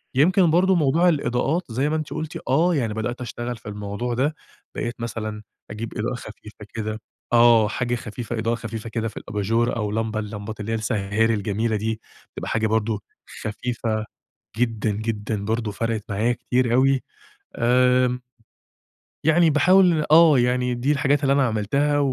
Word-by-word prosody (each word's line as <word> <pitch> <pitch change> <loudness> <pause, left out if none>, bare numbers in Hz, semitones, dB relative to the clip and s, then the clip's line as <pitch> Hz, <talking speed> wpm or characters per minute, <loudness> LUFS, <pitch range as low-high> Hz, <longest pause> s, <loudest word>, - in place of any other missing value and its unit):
يمكن 175 +5 +4
برضو 185 +3 +4
موضوع 165 +2 +3
الإضاءات 145 +2 0
زي 135 +6 0
ما 155 - 0
أنتِ 155 -2 -3
قُلتِ 155 0 -5
آه، 165 +6 +3
يعني 115 -7 -1
بدأت 120 +3 -3
أشتغل 120 0 -5
في 110 - -10
الموضوع 105 +4 -4
ده، 140 +6 0 0.4
بقيت 120 0 -4
مثلًا 110 -2 -4 0.3
أجيب 110 +2 -6
إضاءة 115 +3 -1
خفيفة 105 -2 -11
كده 110 -1 -4 0.3
آه، 120 -2 +6
حاجة 120 +2 -1
خفيفة 120 0 -5
إضاءة 115 +1 0
خفيفة 115 -1 -6
كده 115 0 -2
في 110 - -8
الأباجورة، 115 +4 0
أو 105 -3 -2
لمبة 110 0 -1
اللمبات 105 0 -6
اللي 105 +1 -4
هي - - +1
السَّهّارِي 110 +1 0
الجميلة 110 +2 -1
دي، 110 +1 -2 0.4
تبقى - - -4
حاجة 110 0 +1
برضو 110 -1 0 0.4
خفيفة 110 0 -2 0.5
جدًا، 115 -2 0
جدًا 105 -1 -3
برضو 110 0 -1
فَرَقِت 115 +1 -2
معايا 110 +4 +1
كتير 120 0 0
أوي 135 +1 +3 0.5
آمم 125 +1 +3 1.0
يعني 160 +1 +5
باحاول 170 +1 +4
آه، 160 -3 +7
يعني 125 0 +1
دي 125 +4 +1
الحاجات 145 0 +1
اللي 135 -1 +3
أنا 140 -1 +3
عملتها، 140 +7 +1
115 Hz, 155 wpm, -23 LUFS, 110-135 Hz, 1.0 s, آه